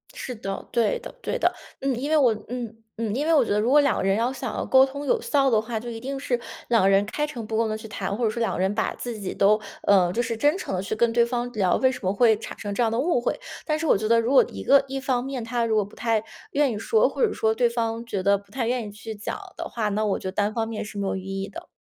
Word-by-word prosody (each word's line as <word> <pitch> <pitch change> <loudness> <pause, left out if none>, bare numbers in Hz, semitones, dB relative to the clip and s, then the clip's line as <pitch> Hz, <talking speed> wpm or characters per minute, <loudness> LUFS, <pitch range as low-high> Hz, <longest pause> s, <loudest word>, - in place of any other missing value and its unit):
是 250 - -5
的， 195 -2 -5
对 230 -4 +1
的 - - -9
对 - - -2
的。 - - +2 0.3
嗯， 270 -2 0
因 285 +3 -3
为 315 - +4
我 250 -6 +5 0.2
嗯 240 -3 -5 0.2
嗯， 225 -2 -2
因 285 +4 -1
为 330 - +3
我 290 - +6
觉 - - -3
得 210 - +2
如 230 +4 +1
果 295 - +6
2 280 - +2
个 - - -1
人 195 +1 +2
要 235 +3 +1
想 260 -3 -5
要 - - -2
沟 265 0 +6
通 280 +2 -6
有 270 - +1
效 275 -2 +2
的 220 -3 +3
话， 225 0 -4
就 240 +2 -7
一 225 -1 -6
定 270 +3 -4
是 255 -4 -1 0.3
2 230 -2 +4
个 195 - +5
人 195 +1 +4
开 295 +8 -2
诚 245 -7 -6
布 220 - -3
公 225 -1 +1
地 215 - -2
去 220 0 -9
谈。 200 -1 -3
或 240 - 0
者 - - +3
说 220 - -4
2 230 - 0
个 - - -3
人 190 +2 +1
把 220 - 0
自 240 -2 -5
己 190 - -4
都 210 +2 +4 0.2
呃， 185 -3 +4
就 235 +5 0
是 230 -1 -2
真 295 - +2
诚 195 - -4
地 180 - -1
去 195 +3 -3
跟 235 +1 +2
对 235 0 +4
方 240 0 -2
聊， 190 -4 +2
为 260 -1 +3
什 255 - -6
么 185 - +1
会 220 0 +4
产 - - -8
生 205 -2 -4
这 240 - +2
样 225 - +1
的 230 - 0
误 290 -4 +2
会。 - - -1 0.3
但 305 -1 0
是 325 - -2
我 - - +5
觉 215 +1 -2
得 230 0 +5
如 230 +2 0
果 - - +8
一 - - -7
个 280 0 +5
一 270 0 -3
方 255 -2 0
面 265 -3 -4
她 235 +1 -1
如 225 -1 +1
果 210 -2 +2
不 205 - -15
太 225 -2 0 0.3
愿 285 -3 +2
意 215 - -3
说， 445 - +3
或 - - -5
者 425 - -1
说 220 0 +1
对 240 0 +3
方 230 0 -2
觉 200 -5 -3
得 200 +1 +3
不 200 0 -18
太 240 -1 -2
愿 245 -2 -1
意 - - -8
去 220 +1 -8
讲 205 - -5 0.2
的 - - -4
话， 220 -3 -1
那 210 +1 0
我 200 - 0
觉 - - -6
得 - - -2
单 205 +2 0
方 225 0 -1
面 225 -1 -4
是 210 -1 -9
没 200 -1 -1
有 - - -1
意 190 - -5 0.2
义 195 - -4
的。 340 +1 -10
230 Hz, 335 characters per minute, -25 LUFS, 210-255 Hz, 0.3 s, 果